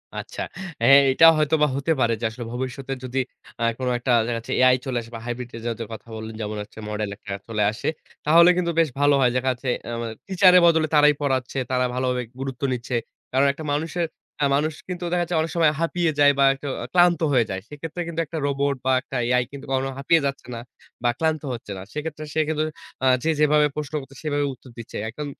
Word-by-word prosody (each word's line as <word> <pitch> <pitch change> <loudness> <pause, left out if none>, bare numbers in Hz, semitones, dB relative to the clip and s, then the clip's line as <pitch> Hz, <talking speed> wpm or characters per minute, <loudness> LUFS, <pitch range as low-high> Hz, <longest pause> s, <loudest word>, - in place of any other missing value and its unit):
আচ্ছা। - - -6 0.4
এহ 135 - +8 0.2
এটা 165 +5 +6
হয়তো 155 +1 +2
বা 150 - +5
হতে 140 +4 -1
পারে 115 0 +3
যে, - - -7
আসলে 120 +1 -8
ভবিষ্যতে 130 +2 -4
যদি 130 +1 -5 0.4
আ - - +1 0.2
কোন 130 - -2
একটা 125 +1 -1
দেখা 120 0 -2
যাচ্ছে 115 - -7
AI 130 0 +6
চলে 130 -2 -2
আসে, 115 +1 -13
বা - - -5
হাইব্রিড 120 0 -4 0.2
জাতের 115 -1 -4
কথা 110 +1 -10
বললেন, 110 0 -7
যেমন 105 0 -4
হচ্ছে 110 - -14
মডেল 105 -1 -2
একটা 100 -2 -7
চলে 105 -2 0
আসে 110 - -6 0.4
তাহলে 170 +3 +7
কিন্তু 170 -1 +1
বেশ 160 -3 +3
ভালো 145 0 +4
হয়। 125 - +5
দেখাযাচ্ছে 125 0 -1 0.2
অ্যাম 115 0 -4 0.3
টিচার 190 -1 +6
এর - - +7
বদলে 160 -1 +3
তারাই 150 0 +6
পড়াচ্ছে। 130 -2 -1
তারা 125 0 +2
ভালোভাবে 125 -1 -1 0.2
গুরুত্ব 135 -1 -5
নিচ্ছে। 125 0 -3 0.4
কারণ 135 +2 +3
একটা 160 - -9
মানুষের, 165 +3 -1 0.3
একটা 145 - +1
মানুষ 155 +2 0
কিন্তু 180 -1 -5
দেখা 175 -1 +2
যাচ্ছে 170 0 -3
অনেক 160 - -3
সময় 160 -3 +4
হাঁপিয়ে 165 0 +1
যায়, 145 0 +7
বা - - +6
একটু 140 +1 -8 0.3
ক্লান্ত 175 -1 +5
হয়ে 120 -3 +4
যায়। 95 0 -4
সেক্ষেত্রে 165 +4 -6
কিন্তু 165 0 -4
একটা 160 +2 -6
রোবট, 140 0 0
বা 130 - +3
একটা 135 - -9
AI 125 0 +3
কিন্তু 140 0 -9
কখনো 135 0 0
হাঁপিয়ে 160 +3 +3
যাচ্ছে 140 -2 -3
না - - -5 0.4
বা 120 - +3
ক্লান্ত 160 -2 +1
হচ্ছে 115 -3 -8
না। - - -7
সেক্ষেত্রে 155 0 -5
সে 160 - 0
কিন্তু 155 0 0 0.4
আ - - +5 0.2
যে, 160 - +1
যেভাবে 150 0 +4
প্রশ্ন 150 0 -5
করছে 135 +1 -14
সেভাবে 145 -1 0
উত্তর 130 +1 -16
দিচ্ছে। 115 - -7
এখন 150 +6 -6
140 Hz, 215 wpm, -23 LUFS, 125-155 Hz, 0.4 s, এহ